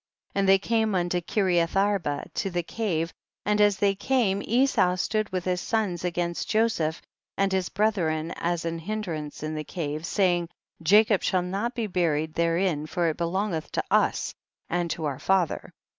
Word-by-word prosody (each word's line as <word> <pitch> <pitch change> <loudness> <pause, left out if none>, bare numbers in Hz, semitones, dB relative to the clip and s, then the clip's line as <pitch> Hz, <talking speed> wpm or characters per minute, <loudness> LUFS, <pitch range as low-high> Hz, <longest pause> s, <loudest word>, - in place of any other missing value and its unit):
50. - - -3
And 195 -1 +3
they 195 - +8
came 220 0 +1
unto 175 0 0
Kireath 175 -3 +1
arba, 195 -7 +1
to 195 - -1
the 175 -1 -1
cave, 170 -5 -2 0.3
and 210 0 +2
as 205 -2 +4
they 200 0 +3
came 200 -1 +1
Esau 235 -7 +3
stood 215 +3 -1
with 185 -1 -2
his 180 -1 0
sons 205 -7 -1
against 175 -1 -2
Jo 225 +1 +4
seph 160 -7 -2 0.3
and 195 0 +2
his 190 -1 0
brethren 170 -6 0
as 170 -1 -1
an 165 0 -2
hindrance 165 -7 -4
in 155 0 -3
the 155 0 -3
cave, 155 0 -4
saying, 175 -4 +1 0.3
Jacob 205 +4 +5
shall 185 -1 +1
not 200 +7 -2
be 235 -3 -1
buried 160 -5 0
therein, 165 -2 +1
for 170 0 0
it 155 - -3
belongeth 175 -1 -2
to - - 0
us - - +2 0.4
and 175 0 0
to 160 -1 -3
our 140 -3 -2
father. 190 -4 0
180 Hz, 175 wpm, -26 LUFS, 165-205 Hz, 0.4 s, they